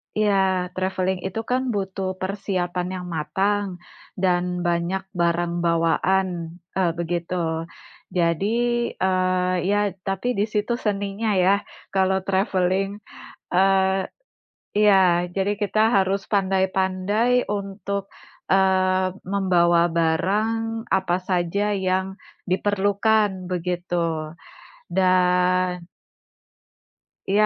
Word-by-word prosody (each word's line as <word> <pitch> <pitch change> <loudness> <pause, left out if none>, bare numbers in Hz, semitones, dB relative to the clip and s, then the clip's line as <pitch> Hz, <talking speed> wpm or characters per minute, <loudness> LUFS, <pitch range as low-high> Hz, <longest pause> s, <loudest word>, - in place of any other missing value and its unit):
Iya, 190 -3 +2
traveling 185 0 -1
itu 210 +4 -4
kan 250 +3 0
butuh 190 -1 -3
persiapan 185 -2 -2
yang 180 -1 -6
matang 200 +6 0 0.5
dan 180 -1 0
banyak 175 +3 0
barang 170 -1 0
bawaan, 170 +3 +2 0.5
eee, 180 -3 +2
begitu. 170 +1 -2 0.8
Jadi, 170 +3 +1 0.5
eee, 185 -1 +1
ya 205 0 +3 0.3
tapi 195 +5 -2
di 205 - +3
situ 210 +2 -1
seninya 205 +1 -1
ya, 185 +2 +4 0.4
kalau 190 0 +2
traveling, 190 0 +1 0.7
eee 190 0 +3 0.7
iya. 185 -4 +4
Jadi 195 +1 +1
kita 210 +1 +1
harus 195 0 +2
pandai-pandai 190 +4 +1
untuk, 200 0 -3 0.5
eee, 185 -1 +3 0.2
membawa 175 -3 +3 0.2
barang 220 +7 0
apa 190 -2 +1
saja 180 +3 0
yang 190 0 -1 0.3
diperlukan 205 +2 +2 0.2
begitu. 170 -3 -2 0.6
Dan 180 -1 +2 1.5
Iya, 210 +2 +4
190 Hz, 90 wpm, -23 LUFS, 180-200 Hz, 1.5 s, ya